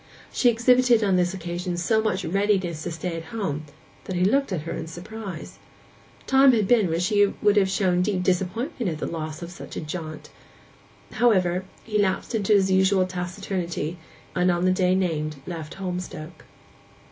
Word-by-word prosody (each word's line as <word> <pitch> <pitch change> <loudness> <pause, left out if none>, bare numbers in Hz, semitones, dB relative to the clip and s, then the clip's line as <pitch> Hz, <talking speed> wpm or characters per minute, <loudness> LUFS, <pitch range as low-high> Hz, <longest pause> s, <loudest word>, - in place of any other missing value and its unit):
She 245 - +4
exhibited 240 0 +4
on 195 -2 +3
this 180 -1 +2
occasion 175 -1 -4
so 220 +5 +2
much 195 -3 -1
readiness 190 -3 0
to 175 - -4
stay 165 +1 -4
at 165 0 -6
home 155 -6 -3 0.4
that 185 - -4
he 180 +1 +2
looked 275 +4 +2
at 175 -5 -1
her 165 +2 -6
in 165 - -4
surprise. 185 +1 -8 0.7
Time 270 0 +6
had 215 -4 +2
been 220 -6 +4
when 165 +1 0
she 205 +3 +3
would 205 0 +3
have 195 -2 +4
shown 185 -2 +2
deep 185 -1 0
disappointment 195 - -1
at 155 - -4
the - - -3
loss 155 0 -5
of 170 - -7
such 175 - -10
a - - -3
jaunt. 155 -1 -6 0.8
However, 185 -6 +2 0.2
he 210 -2 -1
lapsed 190 +3 0
into 215 -1 +2
his 195 -2 +4
usual 190 0 +4
taciturnity, 180 -2 -4 0.4
and 180 +1 +3
on 175 0 +1
the 185 - +4
day 185 0 +2
named 155 -5 -1
left 165 -3 -6
Holmstoke. 180 -3 -6
185 Hz, 175 wpm, -25 LUFS, 175-205 Hz, 0.8 s, Time